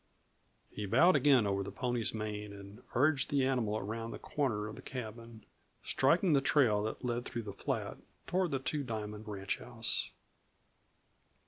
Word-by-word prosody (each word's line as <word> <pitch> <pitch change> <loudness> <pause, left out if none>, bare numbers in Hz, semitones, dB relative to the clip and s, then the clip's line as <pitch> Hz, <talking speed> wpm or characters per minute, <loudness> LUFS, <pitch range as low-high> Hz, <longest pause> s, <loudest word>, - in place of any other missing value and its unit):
He 105 -1 -4
bowed 175 - +6
again 135 -6 +5
over 100 -1 0
the 100 - -5
pony's 120 -3 0
mane 105 -1 -4
and 100 +3 -11
urged 140 +2 +3
the 140 -2 +2
animal 120 -5 +1
around 115 +2 -4
the - - -6
corner 120 -8 -1
of 110 - -7
the - - -10
cabin, 115 -2 -7 0.4
striking 165 +5 +3
the 140 - +5
trail 125 -7 +4
that 110 +4 -4
led 120 0 -1
through 120 -2 -4
the 100 -2 -6
flat - - -3 0.3
toward 185 0 +1
the 140 - 0
Two 145 +3 -2
Diamond 110 -3 -5
ranchhouse. 105 +3 -2
115 Hz, 155 wpm, -33 LUFS, 105-135 Hz, 0.4 s, bowed